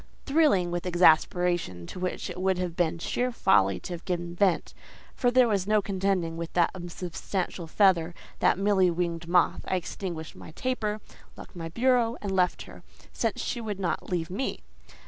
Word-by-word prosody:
Thrilling 275 - +3
with 175 +1 -3
exasperation, 175 - +3
to 180 - -8
which 180 0 -3
it 180 - -6
would 190 -1 +1
have 180 -2 -3
been 170 -1 0
sheer 250 +9 -1
folly 95 - +3
to 180 - -6
have 170 - -7
given 175 -1 -3
vent—for 190 +6 -1
there 250 0 +5
was 200 -4 0
no 215 0 +4
contending 190 -4 -1
with 170 0 -5
that 175 -2 +3
unsubstantial 175 0 -4
feather, 175 -2 +3 0.2
that - - +3
mealy 195 -2 +3
winged 170 -1 -2
moth—I 180 +1 +2
extinguished 170 -2 -5
my 160 - -11
taper, 215 -2 -2 0.4
locked - - -12
my 165 -1 -5
bureau, 240 +3 +2
and 200 - -4
left 180 -2 +1
her, - - -13 0.3
since - - -1
she 240 - -3
would 210 -3 -4
not 180 -3 -2
leave 175 -1 -2
me. 225 +8 -3
180 Hz, 165 wpm, -27 LUFS, 170-200 Hz, 0.4 s, there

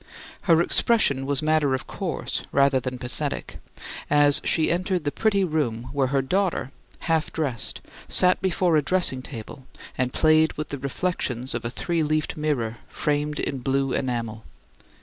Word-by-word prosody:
Her 165 0 +6
expression 140 - +2
was 140 0 -1
matter 155 -3 +2
of 130 - -6
course, - - -4
rather 140 -1 +3
than 130 0 -5
pathetic, 125 -1 -5 0.5
as 145 -1 +7
she 160 - +2
entered 180 0 -1
the 145 - -1
pretty 200 0 +1
room 125 -9 -2
where 140 -2 +1
her 135 0 0
daughter, 180 -3 0 0.3
half 160 -2 0
dressed, 135 -9 -3 0.3
sat 180 0 +3
before 180 -2 +1
a 155 - +4
dressing 145 -4 +1
table 130 +1 -9 0.3
and 125 0 -1
played 155 +1 +3
with 155 0 -5
the 140 - -5
reflections 135 -3 -2
of 120 - -3
a - - -1
three 170 +7 -2
leafed 155 0 0
mirror 130 -7 -2
framed 150 0 -1
in 135 - -2
blue 135 +1 0
enamel. 115 -4 -3
145 Hz, 155 wpm, -24 LUFS, 130-160 Hz, 0.5 s, as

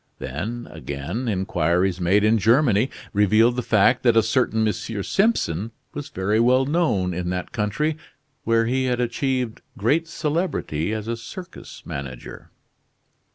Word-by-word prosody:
Then 105 - -5
again, 80 - -5
inquiries 90 -2 0
made 95 +4 +3
in 110 +1 +4
Germany 115 +1 +3 0.2
revealed 110 +4 +4
the 125 - -1
fact 115 +2 +3
that 120 -2 +3
a 115 - +6
certain 110 -1 +1
M. 105 - +1
Simpson 110 - 0 0.2
was 145 -1 -6
very 100 +4 0
well 130 +3 +4
known 135 - +1
in 90 0 -3
that 90 0 -3
country, 150 +10 -1 0.5
where 115 0 +2
he 130 +3 0
had 125 -1 0
achieved 125 -1 -1 0.2
great 150 +11 +1
celebrity 150 - -2
as 110 0 -4
a 115 - -1
circus 175 - -10
manager. 65 -3 -7
115 Hz, 140 wpm, -23 LUFS, 95-130 Hz, 0.5 s, a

